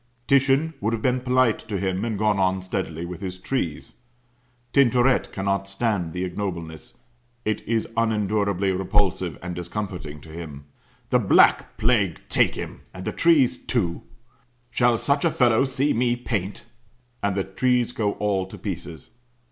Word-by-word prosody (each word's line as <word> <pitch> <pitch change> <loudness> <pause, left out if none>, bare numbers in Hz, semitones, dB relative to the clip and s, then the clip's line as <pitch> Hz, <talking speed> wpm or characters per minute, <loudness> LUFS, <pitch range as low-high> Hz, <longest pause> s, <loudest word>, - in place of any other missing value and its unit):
Titian 140 +4 +3
would 110 +3 0
have 110 - -3
been 130 0 +2
polite 125 -2 +2
to 105 - -4
him, 95 +1 -1
and 115 -3 -2
gone 105 -1 +2
on 95 0 +1
steadily 85 -2 -3
with 90 +1 -7
his 95 -2 -5
trees. 90 - -3 0.8
Tintoret 130 -1 +3
cannot 100 0 -1
stand 100 -4 -1
the 90 +1 -3
ignobleness; 85 -4 -5 0.5
it 110 - 0
is 115 0 0
unendurably 105 -3 +1
repulsive 95 -3 0
and 90 0 -4
discomfiting 90 -4 -5
to 80 - -14
him. 80 -4 -8 0.5
"The - - +5
Black - - +4
Plague 110 -7 +2
take - - +3
him - - -7
and 90 0 -7
the - - -1
trees, 160 -7 +3
too! 90 -9 -1 0.7
Shall 120 -1 +3
such 140 +4 +1
a 170 - +4
fellow 125 -3 +3
see 135 +2 0
me 120 +1 +2
paint!" 105 -5 -3 0.6
And 100 -1 0
the 95 - 0
trees 125 +5 +1
go 105 -4 -1
all 100 -3 -1
to - - -10
pieces. 80 -3 -6
100 Hz, 155 wpm, -24 LUFS, 90-120 Hz, 0.8 s, The